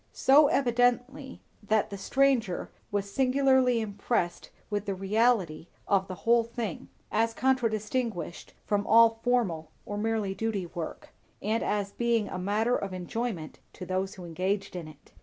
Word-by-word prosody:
So 285 +3 +6
evidently, 250 +2 0 0.2
that 215 0 +1
the - - -4
stranger 255 -5 +1 0.2
was 200 -1 -2
singularly 260 -2 +3
impressed 200 -4 -2 0.2
with 205 0 -2
the 195 - -1
reality 195 -4 +1 0.2
of 195 -1 +2
the 185 - -6
whole 235 0 +5
thing, 230 -5 -5 0.2
as 225 +1 +1
contradistinguished 230 -6 -1
from 205 -1 0
all 225 0 +6
formal 195 -11 0 0.2
or 205 0 -4
merely 215 -3 -1
duty 210 -3 -2
work, 170 -1 -7 0.3
and 220 +2 -1
as 205 -1 -1
being 235 -2 0
a 185 - -4
matter 215 +6 +1
of 195 -1 -3
enjoyment 185 -2 -4
to 180 - -8
those 190 +2 -2
engaged 185 +3 -3
in 170 -3 -5
it. 155 -2 -16
215 Hz, 140 wpm, -28 LUFS, 190-240 Hz, 0.3 s, So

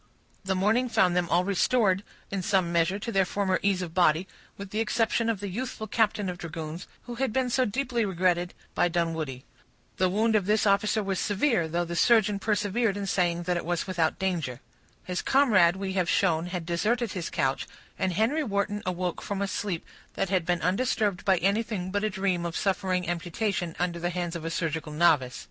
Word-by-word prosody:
The 190 0 -1
morning 220 +7 +2
found 180 -5 +3
them 175 -2 +1
all 175 +2 +3
restored, 195 0 +2 0.3
in 195 -1 -2
some 185 -2 +1
measure, 170 +3 +2
to 225 +3 -5
their 195 -3 +3
former 190 0 0
ease 195 -2 +1
of 165 -2 -7
body, 175 0 +3 0.3
with 200 -1 -8
the 215 - -2
exception 225 +1 +1
of 215 -4 -1
the 205 - -3
youthful 220 +3 -4
captain 210 -2 +1
of 180 -1 -4
dragoons, 165 0 -6 0.2
who 245 - -7
had 265 -4 +1
been 255 +1 0
so 255 +1 +3
deeply 240 +1 -1
regretted 180 -2 0 0.2
by - - +3
Dunwoodie. 160 -6 -2 0.5
The 185 -1 +2
wound 220 +4 +2
of 200 -3 +1
this 215 +1 +2
officer 210 +2 +2
was 195 -2 -2
severe, 205 - +1
though 170 +2 -1
the 170 0 -5
surgeon 210 0 +4
persevered 210 +1 0
in 200 - -3
saying 175 -3 0
that 175 0 0
it - - -3
was 175 0 -1
without 170 -4 0
danger. 170 -10 -2 0.4
His 180 -1 -3
comrade, 205 -11 +4
we 190 0 -4
have 185 -2 0
shown, 170 -3 +2
had 180 -2 -4
deserted 215 +7 0
his 180 -3 -4
couch; 135 -5 -1 0.3
and 185 -1 0
Henry 230 - +1
Wharton 205 -3 -1
awoke 180 -1 -2
from 200 -1 -4
a 200 - 0
sleep 195 -4 -3 0.3
that 195 - -1
had 185 -4 0
been 175 -1 0
undisturbed 205 0 0
by 190 -2 +4
anything 195 0 -1
but 205 +1 -1
a 215 - +1
dream 190 -3 -1
of 170 -1 -3
suffering 185 -2 0
amputation 175 +1 -2
under 175 -1 -1
the 175 +1 -1
hands 175 -1 -3
of 165 -1 -5
a - - -1
surgical 160 -2 -2
novice. 150 -6 +3
185 Hz, 200 wpm, -27 LUFS, 175-210 Hz, 0.5 s, surgeon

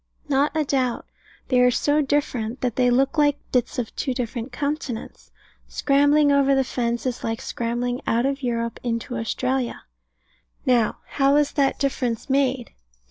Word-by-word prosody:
Not 290 +2 +1
a 310 - +1
doubt. 260 -3 0 0.4
They 255 - +3
are 250 - +6
so 290 +4 +2
different, 260 -5 -1
that 245 -3 -1
they 250 -1 +3
look 270 +5 +2
like 290 -1 +3
bits 245 -2 0
of 240 -3 -3
two 260 - -2
different 240 0 -4
continents. 285 -5 -4 0.4
Scrambling 285 +1 +3
over 275 -1 +4
the 270 - +3
fence 240 -2 -2
is 250 -2 -3
like 225 0 -2
scrambling 245 0 -3
out 235 +2 +2
of 275 0 -1
Europe 235 -2 -2
into 235 0 -3
Australia. 250 +2 -2 0.8
Now, 245 -4 +2
how 275 0 +2
was 295 -1 +3
that 275 -2 +1
difference 260 -3 -2
made? 265 -3 +1
255 Hz, 155 wpm, -23 LUFS, 240-280 Hz, 0.8 s, are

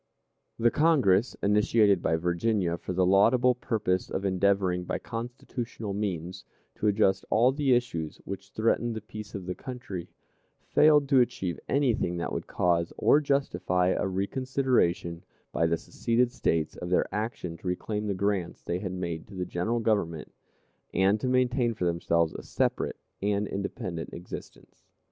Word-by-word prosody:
The 115 0 +3
Congress, 130 - +3
initiated 105 -1 +4
by 80 - +1
Virginia 90 +2 0
for 85 - -6
the 90 0 +2
laudable 115 +7 +5
purpose 110 -7 -1
of 95 - -3
endeavoring, 95 -1 +2
by - - -2
constitutional 115 -2 -5
means, 95 -3 -3 0.3
to 105 - -1
adjust 100 -2 +2
all 120 +4 +4
the 135 -2 +2
issues 85 -11 -2
which 100 0 -7
threatened 115 +2 0
the 110 - -4
peace 105 +1 -9
of 95 -3 -5
the 90 - -3
country, 110 -8 -7 0.6
failed 150 -2 +5
to 135 -3 +6
achieve 95 -7 0
anything 120 -10 +1
that 85 - -3
would - - -4
cause 85 -1 +1
or 150 - +4
justify 90 -11 +1
a 95 - 0
reconsideration 100 -4 0 0.3
by 85 - +1
the 85 0 +1
seceded 120 +7 0
States 80 -10 0
of 90 - -5
their 90 - +3
action 105 -5 -3
to 90 - -9
reclaim 105 +4 -2
the 100 - -1
grants 100 -2 -1
they 85 - -2
had 95 -2 -4
made 85 -3 -4
to 100 - -12
the 90 -1 -2
General 90 +7 -1
Government, 100 -8 -1 0.6
and 100 +3 +3
to 130 - -2
maintain 125 -2 +2
for 90 - -2
themselves 85 -1 +1
a - - -6
separate - - -1 0.2
and 100 +1 0
independent 95 -4 -4
existence. 90 +1 -10
100 Hz, 155 wpm, -28 LUFS, 90-120 Hz, 0.6 s, to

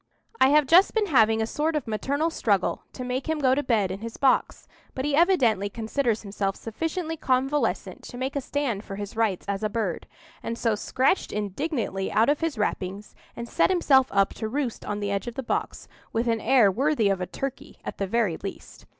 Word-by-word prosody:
"I 260 - +6
have 300 0 +5
just 350 - +5
been 435 -2 +3
having 225 - +3
a - - 0
sort 305 +7 -1
of 300 - -1
maternal 280 +9 -1
struggle 200 - 0
to 255 - -6
make 255 +3 -3
him 320 - +1
go 260 -3 +3
to 285 - +1
bed 220 -8 +1
in 190 - -5
his 230 +1 -7
box; 270 -2 +1 0.3
but 260 - -2
he 295 -1 +1
evidently 265 - +3
considers 225 +2 -1
himself 195 -1 -2
sufficiently 325 - -4
convalescent 270 +1 0
to 245 - -9
make 265 +3 -3
a 280 - 0
stand 255 -7 -2
for 195 - -7
his 205 +1 -6
rights 220 -5 0
as 200 0 -2
a 215 - 0
bird, 210 -6 -3 0.3
and 230 - -4
so 230 -2 +1
scratched 260 - 0
indignantly 210 - -2
out 225 +4 +3
of 290 - +2
his 325 -6 -1
wrappings, 200 -1 -3 0.2
and 235 0 -6
set - - +2
himself 280 -8 +4
up 195 -1 +2
to 220 - -4
roost 260 -1 -3
on 205 0 -4
the 200 0 -1
edge 200 +3 -2
of 240 - -5
the 270 - -4
box, - - -3 0.2
with 230 +2 -1
an 225 -1 +1
air 240 -7 +5
worthy 265 0 +1
of 195 -2 0
a 180 - -2
turkey, 275 0 -6
at - - -6
the 195 - -1
very 210 -5 +1
least. 195 - -9
235 Hz, 210 wpm, -26 LUFS, 205-285 Hz, 0.3 s, I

